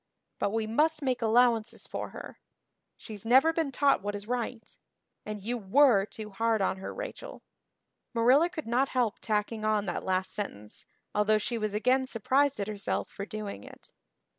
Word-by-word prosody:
But -, -, +1 dB
we 220 Hz, +1 st, -1 dB
must 300 Hz, +7 st, +1 dB
make 255 Hz, -2 st, 0 dB
allowances 230 Hz, 0 st, +2 dB
for -, -, -5 dB
her. -, -, -10 dB, 0.6 s
She's 210 Hz, -4 st, -9 dB
never 265 Hz, +8 st, +5 dB
been 320 Hz, -4 st, -1 dB
taught 275 Hz, -2 st, +3 dB
what 205 Hz, +1 st, -3 dB
is 205 Hz, +1 st, -8 dB
right. 245 Hz, -1 st, -4 dB, 0.5 s
And 210 Hz, -2 st, -5 dB
you 240 Hz, +3 st, -2 dB
were 220 Hz, 0 st, +4 dB
too 215 Hz, -1 st, -8 dB
hard 225 Hz, +2 st, +1 dB
on 190 Hz, -1 st, 0 dB
her, 190 Hz, -, -6 dB
Rachel." -, -, -7 dB, 0.7 s
Marilla 255 Hz, +8 st, +4 dB
could 320 Hz, -3 st, -6 dB
not 250 Hz, +4 st, +1 dB
help 230 Hz, -4 st, +1 dB
tacking 215 Hz, 0 st, -1 dB
on 215 Hz, -1 st, +1 dB
that 180 Hz, -, -3 dB
last 185 Hz, 0 st, -1 dB
sentence, 105 Hz, -, -7 dB, 0.3 s
although 210 Hz, +1 st, +3 dB
she 230 Hz, +2 st, -2 dB
was 215 Hz, -1 st, -2 dB
again 255 Hz, +4 st, +2 dB
surprised 265 Hz, +3 st, +1 dB
at 200 Hz, -, -2 dB
herself 205 Hz, -2 st, -3 dB
for 200 Hz, -, -6 dB
doing 210 Hz, -, -6 dB
it. -, -, -14 dB
225 Hz, 170 wpm, -29 LUFS, 210-255 Hz, 0.7 s, never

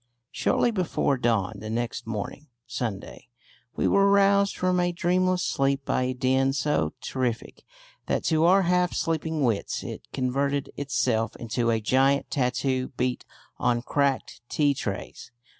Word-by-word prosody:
Shortly 240 Hz, -, +1 dB
before 180 Hz, -8 st, 0 dB
dawn 110 Hz, -4 st, 0 dB
the 110 Hz, -, -7 dB
next 115 Hz, 0 st, -3 dB
morning 110 Hz, +7 st, -5 dB, 0.2 s
(Sunday) 120 Hz, -5 st, -5 dB, 0.5 s
we -, -, +1 dB
were 200 Hz, 0 st, +4 dB
roused 200 Hz, 0 st, +4 dB
from 185 Hz, 0 st, +1 dB
a 175 Hz, 0 st, +1 dB
dreamless 180 Hz, +1 st, +1 dB
sleep 135 Hz, 0 st, 0 dB
by -, -, 0 dB
a 130 Hz, -, -1 dB
din 130 Hz, +1 st, +2 dB
so 140 Hz, -, 0 dB
terrific 125 Hz, -3 st, -3 dB, 0.4 s
that -, -, 0 dB
to 160 Hz, 0 st, +2 dB
our 190 Hz, +3 st, +5 dB
half 180 Hz, 0 st, +1 dB
sleeping 160 Hz, -2 st, -1 dB
wits 115 Hz, -5 st, -1 dB
it -, -, -8 dB
converted 140 Hz, +2 st, -1 dB
itself 115 Hz, -5 st, 0 dB
into 115 Hz, +1 st, -1 dB
a 115 Hz, -1 st, +2 dB
giant 135 Hz, +5 st, +2 dB
tattoo 130 Hz, 0 st, 0 dB
beat 125 Hz, 0 st, -1 dB, 0.3 s
on 120 Hz, -1 st, +1 dB
cracked 140 Hz, 0 st, -1 dB
tea 145 Hz, -2 st, +2 dB
trays. 105 Hz, -4 st, -6 dB
135 Hz, 140 wpm, -26 LUFS, 120-165 Hz, 0.5 s, our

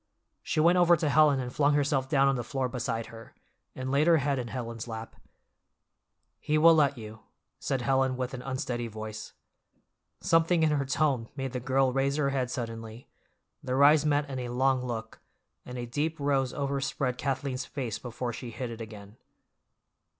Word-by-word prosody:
She -, -, -2 dB
went 170 Hz, +3 st, +5 dB
over 175 Hz, -1 st, +5 dB
to 155 Hz, -2 st, 0 dB
Helen 150 Hz, -2 st, +5 dB
and 125 Hz, -1 st, -4 dB
flung 145 Hz, 0 st, +3 dB
herself 140 Hz, -2 st, +1 dB
down 135 Hz, -2 st, +4 dB
on 135 Hz, -, +2 dB
the 120 Hz, -, -3 dB
floor 130 Hz, +2 st, -2 dB
beside 120 Hz, -2 st, -3 dB
her, 115 Hz, 0 st, -12 dB, 0.4 s
and 130 Hz, 0 st, -4 dB
laid 145 Hz, +3 st, +3 dB
her 170 Hz, -1 st, +6 dB
head 140 Hz, -1 st, 0 dB
in 120 Hz, -, -4 dB
Helen's 115 Hz, -1 st, -5 dB
lap. 110 Hz, -1 st, -7 dB, 1.2 s
"He 150 Hz, -, 0 dB
will 165 Hz, +2 st, +7 dB
let 145 Hz, -4 st, +3 dB
you," 110 Hz, -1 st, -9 dB, 0.4 s
said 135 Hz, -3 st, -2 dB
Helen 130 Hz, 0 st, +1 dB
with 130 Hz, 0 st, -3 dB
an 125 Hz, -, -5 dB
unsteady 125 Hz, -2 st, -3 dB
voice. 110 Hz, 0 st, -7 dB, 0.9 s
Something 165 Hz, -1 st, +3 dB
in 155 Hz, -, +3 dB
her 140 Hz, -2 st, 0 dB
tone 135 Hz, -4 st, 0 dB
made 135 Hz, -2 st, -4 dB
the 125 Hz, -, -2 dB
girl 130 Hz, +1 st, +1 dB
raise 135 Hz, +1 st, +1 dB
her 145 Hz, -2 st, +1 dB
head 130 Hz, -2 st, -1 dB
suddenly—their 115 Hz, +3 st, -5 dB
eyes 150 Hz, +1 st, +6 dB
met 145 Hz, -1 st, +1 dB
in 135 Hz, -2 st, -5 dB
a 125 Hz, -1 st, -4 dB
long 130 Hz, +1 st, +1 dB
look, 115 Hz, -2 st, -5 dB, 0.5 s
and 125 Hz, 0 st, -6 dB
a 120 Hz, -, -4 dB
deep 150 Hz, +7 st, -2 dB
rose 135 Hz, -3 st, +1 dB
overspread 140 Hz, -2 st, -2 dB
Kathleen's 135 Hz, -1 st, -2 dB
face 125 Hz, -7 st, -4 dB
before 120 Hz, 0 st, -5 dB
she 120 Hz, -, -7 dB
hid 120 Hz, +1 st, -5 dB
it 115 Hz, 0 st, -8 dB
again. 105 Hz, -1 st, -10 dB
130 Hz, 180 wpm, -28 LUFS, 120-145 Hz, 1.2 s, will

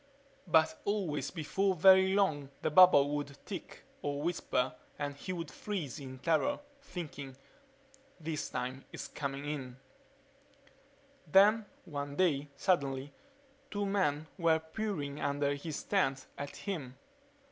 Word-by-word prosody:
But 160 Hz, -1 st, +3 dB
always, 195 Hz, -8 st, -1 dB
before 190 Hz, +4 st, 0 dB
very 190 Hz, +2 st, +7 dB
long, 155 Hz, -9 st, +2 dB
the -, -, +1 dB
bubble 150 Hz, -5 st, +8 dB
would 145 Hz, -1 st, -4 dB
tick -, -, -7 dB, 0.2 s
or 145 Hz, 0 st, -2 dB
whisper 155 Hz, -6 st, 0 dB, 0.2 s
and 145 Hz, -1 st, -3 dB
he 165 Hz, +6 st, -6 dB
would 165 Hz, -4 st, -4 dB
freeze 175 Hz, -12 st, -4 dB
in 130 Hz, -2 st, -8 dB
terror, 165 Hz, -, +1 dB, 0.2 s
thinking, 150 Hz, -, -7 dB, 0.8 s
This 155 Hz, -1 st, -3 dB
time 130 Hz, +2 st, -4 dB
it's -, -, -6 dB
coming 140 Hz, 0 st, -4 dB
in... 135 Hz, -4 st, -4 dB, 1.5 s
Then 210 Hz, +4 st, +6 dB, 0.2 s
one 145 Hz, -4 st, -5 dB
day, 145 Hz, -5 st, +2 dB
suddenly, 140 Hz, -5 st, 0 dB, 0.6 s
two 205 Hz, -3 st, -1 dB
men 185 Hz, -7 st, +1 dB
were 165 Hz, -2 st, +4 dB
peering 160 Hz, -4 st, -4 dB
under 145 Hz, 0 st, +1 dB
his 145 Hz, +2 st, -5 dB
tent 135 Hz, -10 st, +1 dB
at 145 Hz, 0 st, -6 dB
him. 140 Hz, -11 st, -5 dB
150 Hz, 125 wpm, -33 LUFS, 140-185 Hz, 1.5 s, bubble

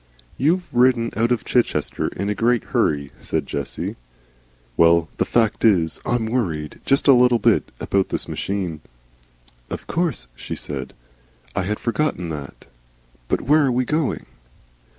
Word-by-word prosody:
"You've 170 Hz, +7 st, +2 dB
ridden 120 Hz, -1 st, +3 dB
out 115 Hz, +2 st, +1 dB
of 120 Hz, -4 st, 0 dB
Chichester 120 Hz, -2 st, 0 dB
in 100 Hz, -, -4 dB
a 105 Hz, -, +1 dB
great 115 Hz, +2 st, +2 dB
hurry," 70 Hz, -3 st, 0 dB
said -, -, -2 dB
Jessie. 70 Hz, -1 st, -4 dB, 0.8 s
"Well, 85 Hz, 0 st, +4 dB
the -, -, +1 dB
fact 115 Hz, -3 st, +1 dB
of 115 Hz, -, +8 dB
it 100 Hz, -, +5 dB
is, 80 Hz, -2 st, -3 dB
I'm 120 Hz, -2 st, 0 dB
worried, 90 Hz, -11 st, -2 dB
just 135 Hz, +2 st, +3 dB
a 140 Hz, -, +9 dB
little 125 Hz, -1 st, +5 dB
bit. 110 Hz, -, +2 dB
About 100 Hz, -1 st, 0 dB
this -, -, -3 dB
machine." 90 Hz, -6 st, -3 dB, 0.9 s
"Of -, -, -6 dB
course," 165 Hz, -, -1 dB
she -, -, -6 dB
said. -, -, -5 dB, 0.6 s
"I 95 Hz, -, 0 dB
had 105 Hz, +2 st, -2 dB
forgotten 115 Hz, -, -1 dB
that. 75 Hz, -3 st, -7 dB, 0.6 s
But -, -, 0 dB
where 150 Hz, +3 st, +4 dB
are 135 Hz, -, +2 dB
we 125 Hz, +1 st, +1 dB
going?" 155 Hz, +2 st, -1 dB
115 Hz, 155 wpm, -22 LUFS, 85-125 Hz, 0.9 s, a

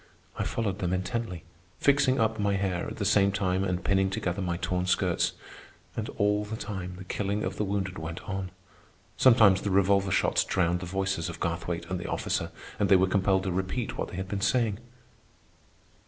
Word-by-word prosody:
I -, -, -1 dB
followed 105 Hz, -4 st, -2 dB
them 90 Hz, -2 st, -1 dB
intently, 95 Hz, -1 st, -3 dB, 0.4 s
fixing 140 Hz, -2 st, +3 dB
up 110 Hz, 0 st, +1 dB
my 100 Hz, -1 st, +1 dB
hair 95 Hz, -3 st, -1 dB
at -, -, -6 dB
the 100 Hz, -, -3 dB
same 100 Hz, 0 st, +4 dB
time 95 Hz, -1 st, 0 dB
and 90 Hz, -1 st, -1 dB
pinning 95 Hz, 0 st, +2 dB
together 95 Hz, 0 st, -2 dB
my 85 Hz, -2 st, -1 dB
torn 90 Hz, 0 st, -1 dB
skirts. -, -, +1 dB, 0.6 s
And -, -, -3 dB
all 105 Hz, 0 st, +2 dB
the 105 Hz, +2 st, -5 dB
time 95 Hz, -4 st, -5 dB
the 95 Hz, -, -8 dB
killing 100 Hz, +2 st, -2 dB
of -, -, -3 dB
the -, -, 0 dB
wounded 95 Hz, -2 st, -2 dB
went 80 Hz, +2 st, -5 dB
on. 95 Hz, -2 st, -4 dB, 0.7 s
Sometimes 110 Hz, -7 st, +6 dB
the 100 Hz, -, -2 dB
revolver 100 Hz, 0 st, +3 dB
shots -, -, +2 dB
drowned 90 Hz, -1 st, +1 dB
the 90 Hz, -, -6 dB
voices 95 Hz, -2 st, -1 dB
of 85 Hz, -, -7 dB
Garthwaite 85 Hz, 0 st, -2 dB
and 90 Hz, -, -1 dB
the 85 Hz, -, -5 dB
officer, -, -, -1 dB, 0.3 s
and 100 Hz, -, +2 dB
they 100 Hz, -, +7 dB
were 95 Hz, 0 st, +5 dB
compelled 95 Hz, 0 st, +2 dB
to 95 Hz, -, -1 dB
repeat 95 Hz, +6 st, -2 dB
what -, -, -3 dB
they -, -, -9 dB
had 95 Hz, +1 st, -4 dB
been 100 Hz, 0 st, -3 dB
saying. 110 Hz, -1 st, +1 dB
95 Hz, 195 wpm, -28 LUFS, 90-100 Hz, 0.7 s, they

